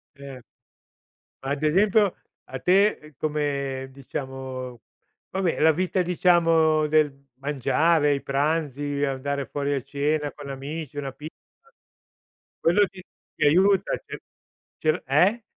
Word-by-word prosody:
Cer 140 Hz, -3 st, -10 dB, 1.0 s
ma 135 Hz, -, -4 dB
ad 145 Hz, +1 st, -2 dB
esempio, 200 Hz, +4 st, +3 dB, 0.3 s
a -, -, -7 dB
te, 195 Hz, +4 st, +4 dB
ehm, 150 Hz, -1 st, -16 dB
come 140 Hz, -3 st, -2 dB
diciamo 130 Hz, -2 st, -7 dB, 0.5 s
vabbè 190 Hz, -3 st, -1 dB
la 160 Hz, +1 st, +5 dB
vita 185 Hz, +3 st, -1 dB
diciamo 165 Hz, -3 st, +3 dB
del 150 Hz, -1 st, +3 dB, 0.2 s
mangiare, 145 Hz, +3 st, +2 dB
i 140 Hz, -, -4 dB
pranzi, 145 Hz, 0 st, -1 dB
andare 140 Hz, 0 st, -2 dB
fuori 145 Hz, 0 st, -2 dB
a 135 Hz, -, -2 dB
cena 145 Hz, +2 st, -1 dB
con 145 Hz, -1 st, -10 dB
amici, 145 Hz, +2 st, -6 dB
una 140 Hz, -2 st, -3 dB
pizza. 155 Hz, +3 st, -10 dB, 1.3 s
Quello 180 Hz, +5 st, +4 dB
ti 185 Hz, -1 st, -13 dB, 0.3 s
ti -, -, -2 dB
aiuta, 190 Hz, +5 st, +3 dB
ti -, -, -7 dB, 0.6 s
cioè 155 Hz, -, +3 dB
l 160 Hz, -, -5 dB
eh? 185 Hz, -, +3 dB
150 Hz, 125 wpm, -25 LUFS, 140-165 Hz, 1.3 s, la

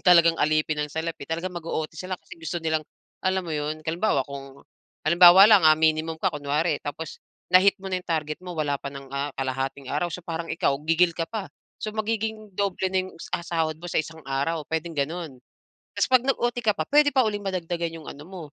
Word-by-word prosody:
talagang 170 Hz, -2 st, +7 dB
alipin 155 Hz, 0 st, +1 dB
ng 150 Hz, 0 st, -3 dB
salapi 160 Hz, -2 st, -4 dB
talagang 170 Hz, +3 st, -3 dB
mag-o-OT 160 Hz, -2 st, -3 dB
sila 185 Hz, +3 st, -4 dB
kasi -, -, -13 dB
gusto 165 Hz, +2 st, -3 dB
nilang, 160 Hz, -1 st, 0 dB, 0.4 s
alam 185 Hz, 0 st, +1 dB
mo 165 Hz, -, -5 dB
'yon 150 Hz, +1 st, -2 dB
halimbawa 160 Hz, -4 st, +1 dB
kung 140 Hz, -1 st, -9 dB, 0.5 s
halimbawa 175 Hz, +3 st, +9 dB
lang 210 Hz, -5 st, +7 dB
ah, 155 Hz, 0 st, +7 dB
minimum 160 Hz, 0 st, +2 dB
ka 190 Hz, -, +1 dB
kunwari 150 Hz, +2 st, 0 dB
tapos, 145 Hz, +2 st, -6 dB, 0.3 s
na-hit 190 Hz, +2 st, +6 dB
mo 195 Hz, -, -6 dB
na 185 Hz, -, 0 dB
'yong -, -, -24 dB
target 155 Hz, -2 st, -1 dB
mo 180 Hz, -2 st, -6 dB
wala 145 Hz, -2 st, 0 dB
pa -, -, -5 dB
ng, 140 Hz, -1 st, -9 dB
ah, 140 Hz, +1 st, -1 dB
kalahating 135 Hz, +1 st, -3 dB
araw 150 Hz, +5 st, 0 dB
so -, -, -5 dB
parang 165 Hz, 0 st, -4 dB
ikaw 165 Hz, -3 st, +1 dB, 0.2 s
gigil 170 Hz, +1 st, +4 dB
ka 165 Hz, -1 st, -2 dB
pa. 215 Hz, -4 st, -4 dB, 0.3 s
So, 215 Hz, -, -4 dB
magiging 220 Hz, -1 st, -2 dB
doble 195 Hz, -2 st, 0 dB
na 185 Hz, 0 st, 0 dB
'yong, -, -, -11 dB, 0.2 s
ah, 170 Hz, -, -8 dB
sahod 160 Hz, -2 st, -1 dB
mo 175 Hz, -, -7 dB
sa -, -, +3 dB
isang 160 Hz, +1 st, -11 dB
araw 140 Hz, +4 st, -1 dB
puwedeng 160 Hz, 0 st, -3 dB
gano'n. 155 Hz, 0 st, -3 dB, 0.6 s
Ta's -, -, +3 dB
'pag 255 Hz, -2 st, +4 dB
nag-OT 245 Hz, -2 st, 0 dB
ka 215 Hz, -, +4 dB
pa, 155 Hz, -, -1 dB
puwede 290 Hz, 0 st, +5 dB
pa 260 Hz, -2 st, +5 dB
uling 205 Hz, -1 st, -4 dB
madagdagan 175 Hz, -3 st, -2 dB
'yong 160 Hz, -, -10 dB
ano 145 Hz, -, -10 dB
mo, 185 Hz, -2 st, -8 dB
165 Hz, 210 wpm, -25 LUFS, 155-185 Hz, 0.6 s, halimbawa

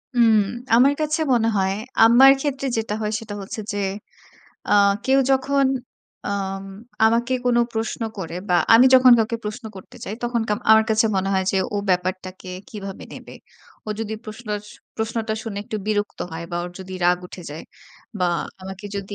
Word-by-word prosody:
হুম, 230 Hz, -2 st, +5 dB, 0.4 s
আমার 270 Hz, +4 st, +5 dB
কাছে 310 Hz, +1 st, 0 dB
মনে 230 Hz, -2 st, +2 dB
হয় 190 Hz, 0 st, +1 dB, 0.3 s
আমার 250 Hz, +4 st, +8 dB
ক্ষেত্রে 275 Hz, -2 st, -2 dB
যেটা 220 Hz, -2 st, -2 dB
হয় 210 Hz, -, -1 dB
সেটা 210 Hz, -2 st, -8 dB
হচ্ছে 195 Hz, +4 st, -7 dB
যে, -, -, -3 dB, 0.9 s
আ -, -, +2 dB, 0.3 s
কেউ 270 Hz, +1 st, +3 dB
যখন 275 Hz, +1 st, +2 dB, 0.6 s
আম 195 Hz, -1 st, -3 dB, 0.4 s
আমাকে 235 Hz, +3 st, +2 dB
কোনো 240 Hz, -1 st, +3 dB
প্রশ্ন 225 Hz, +1 st, -3 dB, 0.2 s
করে 165 Hz, -2 st, -5 dB
বা 180 Hz, -, +2 dB, 0.2 s
আমি 245 Hz, +3 st, +8 dB
যখন 255 Hz, -1 st, +8 dB
কাউকে 225 Hz, +1 st, 0 dB
প্রশ্ন 215 Hz, +4 st, -6 dB
করতে 185 Hz, -, -13 dB
চাই 205 Hz, -, -5 dB
তখন 240 Hz, -1 st, 0 dB
কা -, -, +1 dB, 0.2 s
আমার 220 Hz, 0 st, +7 dB
কাছে 220 Hz, +1 st, +3 dB
মনে 190 Hz, +1 st, 0 dB
হয় 190 Hz, -, +1 dB
যে, 195 Hz, -, -1 dB, 0.2 s
ও -, -, 0 dB
ব্যাপারটাকে 185 Hz, +1 st, -2 dB, 0.2 s
কিভাবে 200 Hz, -5 st, -8 dB
নেবে। -, -, -11 dB, 0.5 s
ও -, -, -6 dB
যদি 220 Hz, -1 st, -4 dB
প্রশআস 215 Hz, -1 st, -6 dB, 0.3 s
প্রশ্নটা 220 Hz, 0 st, -2 dB
শুনে 210 Hz, -3 st, -5 dB
একটু 215 Hz, -, -4 dB
বিরক্ত 210 Hz, -1 st, -1 dB
হয় 165 Hz, -, -5 dB
বা 175 Hz, -, -3 dB
ওর 175 Hz, -, -6 dB
যদি 190 Hz, 0 st, -9 dB
রাগ 180 Hz, 0 st, +4 dB
উঠে 180 Hz, -, -10 dB
যায় 155 Hz, +2 st, -7 dB, 0.6 s
বা 180 Hz, -, +1 dB, 0.4 s
আমাকে 190 Hz, +2 st, -8 dB
যদি 200 Hz, +1 st, -5 dB
215 Hz, 170 wpm, -22 LUFS, 195-240 Hz, 0.9 s, আমার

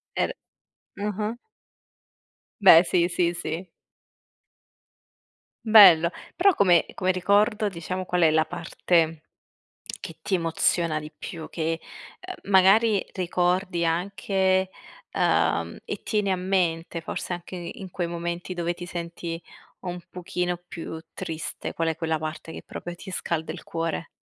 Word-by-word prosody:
Er -, -, +1 dB, 0.7 s
ah-ah. 210 Hz, +2 st, -2 dB, 1.3 s
Beh, 175 Hz, -4 st, +9 dB
sì, 175 Hz, -1 st, +2 dB
sì, 175 Hz, -1 st, +1 dB
sì. 170 Hz, +1 st, -4 dB, 2.0 s
Bello. 190 Hz, -7 st, +9 dB, 0.3 s
Però 390 Hz, +2 st, +5 dB
come 180 Hz, -, +4 dB
come 185 Hz, 0 st, +1 dB
ricordo 205 Hz, +4 st, +2 dB
diciamo 185 Hz, 0 st, -4 dB
qual 180 Hz, 0 st, 0 dB
è 160 Hz, -2 st, +6 dB
la 155 Hz, 0 st, +3 dB
parte 165 Hz, -1 st, 0 dB, 0.8 s
che -, -, -8 dB
ti 200 Hz, -, -1 dB
emoziona 165 Hz, -1 st, +1 dB
di 150 Hz, 0 st, -9 dB
più 165 Hz, -3 st, -7 dB
che, 165 Hz, 0 st, -2 dB, 0.4 s
ehm, 370 Hz, -, -9 dB
magari 200 Hz, +2 st, +5 dB
ricordi 180 Hz, 0 st, 0 dB
anche 190 Hz, +2 st, +1 dB, 0.4 s
ehm, -, -, +1 dB
e -, -, -5 dB
tieni 210 Hz, -3 st, 0 dB
a 190 Hz, -, +2 dB
mente 175 Hz, -3 st, 0 dB
forse 165 Hz, -, -5 dB
anche 175 Hz, +1 st, -6 dB
in 180 Hz, +2 st, -7 dB
quei 175 Hz, 0 st, -2 dB
momenti 170 Hz, +1 st, -4 dB
dove 175 Hz, 0 st, -1 dB
ti 175 Hz, 0 st, -8 dB
senti 170 Hz, -1 st, -5 dB, 0.4 s
un 180 Hz, -1 st, -5 dB
pochino 180 Hz, 0 st, -3 dB
più 160 Hz, 0 st, -6 dB
triste, 160 Hz, 0 st, -5 dB
qual 165 Hz, 0 st, 0 dB
è 160 Hz, -, -1 dB
quella 160 Hz, -1 st, -1 dB
parte 155 Hz, +1 st, -6 dB
che -, -, -8 dB
proprio 175 Hz, -, -7 dB
ti 190 Hz, +2 st, -10 dB
scalda 165 Hz, -3 st, -2 dB
il 165 Hz, -, -10 dB
cuore? 165 Hz, 0 st, -3 dB
175 Hz, 130 wpm, -25 LUFS, 165-190 Hz, 2.0 s, Beh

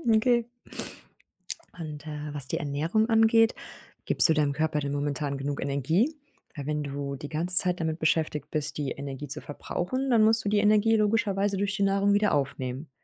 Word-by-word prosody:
Okay. 235 Hz, +1 st, +2 dB, 1.3 s
Und, 155 Hz, -2 st, -8 dB
äh, 150 Hz, -1 st, -6 dB
was 140 Hz, -3 st, -5 dB
die -, -, -2 dB
Ernährung 160 Hz, +11 st, -1 dB
angeht, 225 Hz, 0 st, +4 dB, 0.5 s
gibst -, -, +4 dB
du -, -, +5 dB
deinem 150 Hz, -2 st, +1 dB
Körper 155 Hz, 0 st, -1 dB
denn 140 Hz, -1 st, -3 dB
momentan 145 Hz, 0 st, -2 dB
genug 140 Hz, +1 st, -4 dB
Energie? 150 Hz, -, 0 dB, 0.4 s
Weil 145 Hz, -, -6 dB
wenn 150 Hz, 0 st, -2 dB
du 140 Hz, 0 st, -5 dB
die 145 Hz, +2 st, -8 dB
ganze 175 Hz, +4 st, -1 dB
Zeit 180 Hz, -2 st, +8 dB
damit 160 Hz, 0 st, -2 dB
beschäftigt 160 Hz, -2 st, -1 dB
bist, 150 Hz, -1 st, -3 dB
die 145 Hz, -3 st, -3 dB
Energie 140 Hz, +1 st, -6 dB
zu 145 Hz, +3 st, -6 dB
verbrauchen, 255 Hz, -, -4 dB
dann 230 Hz, -3 st, +4 dB
musst 225 Hz, +1 st, +3 dB
du 200 Hz, -, +1 dB
die 210 Hz, -, +1 dB
Energie 215 Hz, +2 st, +3 dB
logischerweise 205 Hz, -2 st, +1 dB
durch 200 Hz, +1 st, -1 dB
die 200 Hz, -, 0 dB
Nahrung 200 Hz, +1 st, +2 dB
wieder 205 Hz, +1 st, +2 dB
aufnehmen. 135 Hz, 0 st, -3 dB
160 Hz, 180 wpm, -27 LUFS, 145-205 Hz, 1.3 s, Zeit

